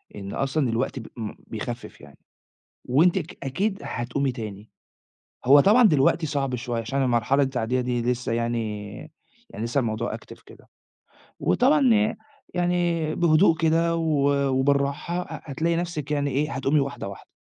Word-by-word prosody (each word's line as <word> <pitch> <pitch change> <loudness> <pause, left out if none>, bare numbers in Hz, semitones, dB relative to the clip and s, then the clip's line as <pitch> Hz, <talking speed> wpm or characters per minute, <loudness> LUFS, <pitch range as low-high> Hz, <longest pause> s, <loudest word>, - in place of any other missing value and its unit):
إن 100 -1 -7
أصلًا 135 0 0
الوقت 120 +3 -1
ب 115 - -9
إم 110 -2 -5
بيخفِّف 120 +2 -6
يعني 70 -1 -15 0.7
وأنتِ 165 +9 +3
ك 165 -1 -9
أكيد 195 +9 -1
هتقومي 125 +3 -2
تاني. 110 -3 -8 0.8
هو 140 +3 +7
طبعًا 215 - +5
دلوقتي 160 -2 +3
صعب 140 -3 -1
شوية 120 -1 -3
عشان 135 +5 -1
المرحلة 130 +3 +2
التعدية 130 -2 0
دي 125 -1 -1
لسه 125 0 -1
يعني، 115 -3 -2 0.6
يعني 105 - -5
لسه 120 +4 -1
الموضوع 110 -3 -2
active - - -14
كده، - - -17 0.7
وطبعًا 265 -2 +4
ي 215 0 +2 0.4
يعني 175 -3 0
بهدوء 165 0 +4
كده 165 +1 +2
و 140 -4 +1
وبالراحة 140 +5 0
ه - - -8
هتلاقي 165 +4 -1
نفسِك 165 -4 -3
يعني 145 -1 0
إيه، 145 +4 -1
هتقومي 135 +2 +1
وحداة، 140 -6 -4
واحدة. 100 - -10
140 Hz, 150 wpm, -25 LUFS, 120-165 Hz, 0.8 s, هو